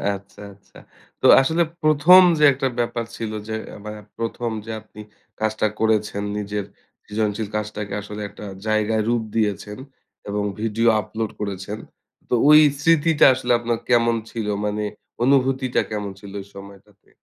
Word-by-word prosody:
আচ্ছা, 100 Hz, +1 st, -13 dB
আচ্ছা। 100 Hz, 0 st, -21 dB, 0.4 s
তো -, -, -1 dB, 0.2 s
আসলে 160 Hz, +5 st, +1 dB, 0.2 s
১ম 155 Hz, +5 st, +7 dB, 0.2 s
যে -, -, +3 dB
একটা 135 Hz, 0 st, -1 dB
ব্যাপার 120 Hz, 0 st, -1 dB
ছিল 115 Hz, -2 st, -4 dB, 0.2 s
যে 110 Hz, -, -4 dB
অ্যা -, -, -10 dB
বা 105 Hz, -, -5 dB, 0.3 s
১ম 115 Hz, +1 st, -3 dB
যে 115 Hz, -, -6 dB
আপনি 105 Hz, 0 st, -13 dB, 0.4 s
কাজটা 110 Hz, 0 st, 0 dB
করেছেন 105 Hz, -2 st, 0 dB
নিজের 105 Hz, -1 st, -3 dB, 0.4 s
সৃজনশীল 105 Hz, 0 st, -2 dB
কাজটাকে 105 Hz, -1 st, -4 dB
আসলে 105 Hz, +1 st, -8 dB
একটা 105 Hz, -, -11 dB, 0.2 s
জায়গায় 110 Hz, 0 st, +1 dB
রূপ 120 Hz, -1 st, +1 dB
দিয়েছেন 105 Hz, -1 st, -1 dB, 0.5 s
এবং 105 Hz, 0 st, -1 dB, 0.2 s
ভিডিও 115 Hz, +1 st, 0 dB
আপলোড 110 Hz, +1 st, -4 dB
করেছেন, 100 Hz, 0 st, -4 dB, 0.5 s
তো -, -, -1 dB, 0.2 s
ওই 150 Hz, 0 st, +9 dB, 0.2 s
স্মৃতিটা 165 Hz, -1 st, +4 dB
আসলে 125 Hz, -1 st, -2 dB
আপনার 120 Hz, 0 st, -1 dB
কেমন 115 Hz, -1 st, +3 dB, 0.2 s
ছিল? 110 Hz, -3 st, -4 dB, 0.2 s
মানে 105 Hz, 0 st, -2 dB, 0.4 s
অনুভূতিটা 130 Hz, -1 st, +2 dB
কেমন 105 Hz, -2 st, -3 dB
ছিল 100 Hz, -1 st, -11 dB
ওই 95 Hz, -, -12 dB
সময়টাতে? 100 Hz, +1 st, -14 dB
110 Hz, 145 wpm, -22 LUFS, 105-120 Hz, 0.5 s, ওই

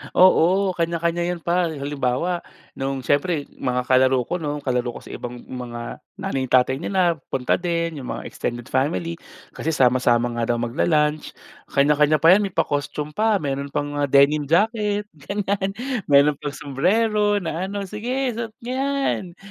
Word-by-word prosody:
Oo, 185 Hz, +1 st, +5 dB
kanya-kanya 170 Hz, 0 st, -1 dB
'yon 175 Hz, -2 st, -4 dB
par. 175 Hz, 0 st, +1 dB
Halimbawa, 140 Hz, +4 st, -1 dB, 0.3 s
no'ng 135 Hz, -1 st, -4 dB
syempre 145 Hz, +3 st, +1 dB
mga 125 Hz, -1 st, -2 dB
kalaro 130 Hz, 0 st, +3 dB
ko 180 Hz, +8 st, -3 dB
no'n, 150 Hz, -2 st, -4 dB
kalaro 125 Hz, -2 st, -1 dB
ko -, -, -8 dB
sa -, -, -11 dB
ibang 120 Hz, 0 st, -7 dB
mga 120 Hz, -2 st, -7 dB, 0.2 s
nanay 130 Hz, -1 st, -3 dB
tatay 130 Hz, +2 st, +3 dB
nila 175 Hz, -2 st, +1 dB
punta 130 Hz, +5 st, 0 dB
din, 170 Hz, -3 st, -2 dB
'yong 125 Hz, -, -7 dB
mga -, -, -5 dB
extended 120 Hz, 0 st, -4 dB
family. 165 Hz, +5 st, -1 dB, 0.3 s
Kasi 160 Hz, 0 st, -2 dB
sama-sama 120 Hz, -2 st, +3 dB
nga 115 Hz, -, 0 dB
daw 120 Hz, -, +1 dB
magla-lunch. 150 Hz, +5 st, 0 dB, 0.3 s
Kanya-kanya 150 Hz, +2 st, +3 dB
pa 160 Hz, +4 st, +5 dB
'yan, 200 Hz, +1 st, +5 dB
may 190 Hz, -, -12 dB
pa-costume 145 Hz, +1 st, -1 dB
pa, 215 Hz, +4 st, +2 dB
mayroon 140 Hz, 0 st, -2 dB
pang, 145 Hz, +1 st, -3 dB
ah, 145 Hz, -, +1 dB
denim 140 Hz, +2 st, +4 dB
jacket 210 Hz, -, +1 dB, 0.2 s
ganyan. 200 Hz, -1 st, -1 dB, 0.3 s
Mayroon 145 Hz, 0 st, +4 dB
pang 145 Hz, -2 st, -5 dB
sumbrero 205 Hz, -, +1 dB
na 170 Hz, +3 st, -3 dB
ano, 200 Hz, 0 st, -4 dB
"Sige 245 Hz, +6 st, -2 dB
suot 225 Hz, -2 st, -5 dB
niyo 245 Hz, -, -4 dB
'yan!" 275 Hz, -10 st, -1 dB
150 Hz, 155 wpm, -22 LUFS, 135-185 Hz, 0.3 s, Oo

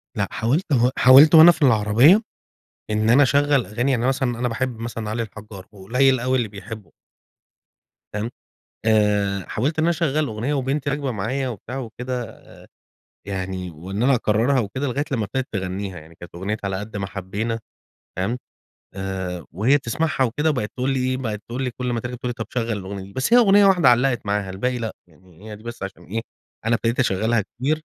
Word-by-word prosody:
لأ، -, -, 0 dB
حاولت 140 Hz, +9 st, -1 dB
و 125 Hz, -1 st, +4 dB
حاولت 135 Hz, +6 st, +8 dB
وأنا 160 Hz, +2 st, +10 dB
في 160 Hz, -2 st, -7 dB
العربيَّة، 125 Hz, -, +5 dB, 0.7 s
إن 110 Hz, +1 st, +1 dB
أنا 140 Hz, +4 st, +6 dB
أشَغَّل 140 Hz, -1 st, +3 dB
أغاني 120 Hz, +6 st, -1 dB
يعني 125 Hz, -1 st, +1 dB
مثلًا 135 Hz, 0 st, 0 dB
أنا 120 Hz, -1 st, -3 dB
مثلًا -, -, -7 dB
أنا 125 Hz, -, +1 dB
باحب 120 Hz, 0 st, -3 dB
مثلًا 115 Hz, -2 st, -5 dB
علي 115 Hz, +2 st, -2 dB
الحجّار، 105 Hz, -3 st, -10 dB
وقليل 125 Hz, +6 st, +2 dB
أوي 130 Hz, +1 st, +1 dB
اللي 115 Hz, -4 st, -1 dB
بيحبُّه. 105 Hz, -3 st, -10 dB, 1.2 s
فاهم، 105 Hz, +2 st, -2 dB, 0.6 s
آآ 105 Hz, -3 st, +2 dB
حاولت 145 Hz, +8 st, -1 dB
إن 155 Hz, -, +2 dB
أنا 170 Hz, -, +3 dB
أشَغَّل 155 Hz, -3 st, 0 dB
أغنية 115 Hz, +6 st, -3 dB
وبنتي 140 Hz, +1 st, -1 dB
راكبة 140 Hz, -2 st, -2 dB
معايا 125 Hz, +6 st, -2 dB
وبتاع 120 Hz, +3 st, -7 dB
وكده، 125 Hz, 0 st, -5 dB, 0.9 s
يعني 95 Hz, -2 st, -4 dB
وإن 95 Hz, +7 st, -5 dB
أنا 135 Hz, +2 st, +4 dB
أكرّرها 120 Hz, +3 st, +2 dB
وكده 130 Hz, +7 st, -3 dB
لغاية 140 Hz, +3 st, -1 dB
لمّا 115 Hz, -6 st, 0 dB
ابتدت 130 Hz, +6 st, -3 dB
تغنّيها، 95 Hz, -1 st, -4 dB
يعني 80 Hz, +1 st, -15 dB
كانت 85 Hz, 0 st, -13 dB
أغنية 100 Hz, +5 st, -3 dB
على 95 Hz, -1 st, -1 dB
قَدّ 105 Hz, +1 st, -7 dB
ما 95 Hz, -1 st, -3 dB
حبينا 105 Hz, +4 st, -4 dB, 0.6 s
فاهم، 100 Hz, +7 st, -1 dB, 0.6 s
آآ 95 Hz, -2 st, -4 dB
وهي 110 Hz, -, +3 dB
بتسمعها 140 Hz, +1 st, 0 dB
وكده 150 Hz, +7 st, 0 dB
وبقت 115 Hz, -8 st, -2 dB
تقول 130 Hz, +1 st, 0 dB
لي 135 Hz, -, 0 dB
إيه، 130 Hz, -, 0 dB
بقت 110 Hz, -5 st, -4 dB
تقول 125 Hz, +3 st, -3 dB
لي 125 Hz, -, -1 dB
كل 125 Hz, +1 st, -4 dB
ما 120 Hz, -, -1 dB
تركب 120 Hz, +2 st, -5 dB
تقول 125 Hz, -, -4 dB
لي -, -, -1 dB
طب 115 Hz, -3 st, -6 dB
شغل 115 Hz, -2 st, -2 dB
الأغنية 100 Hz, -1 st, -5 dB
دي، 100 Hz, +1 st, -12 dB
بس 130 Hz, -, -2 dB
هي 245 Hz, -, +8 dB
أغنية 205 Hz, -3 st, +6 dB
واحدة 180 Hz, -8 st, +5 dB
علقت 125 Hz, -1 st, +2 dB
معاها، 100 Hz, -1 st, -1 dB
الباقي 125 Hz, +7 st, -2 dB
لأ، 115 Hz, -2 st, -4 dB
يعني 90 Hz, +5 st, -16 dB
هي 105 Hz, -, -7 dB
دي 110 Hz, -, -16 dB
بس 120 Hz, -3 st, -8 dB
عشان 95 Hz, -3 st, -7 dB
إيه 110 Hz, +6 st, -3 dB, 0.5 s
أنا 115 Hz, -, +3 dB
ابتديت 115 Hz, +2 st, -1 dB
أشَغَّلها 110 Hz, 0 st, +1 dB
كتير، 145 Hz, +10 st, -2 dB
115 Hz, 195 wpm, -22 LUFS, 100-130 Hz, 1.2 s, وأنا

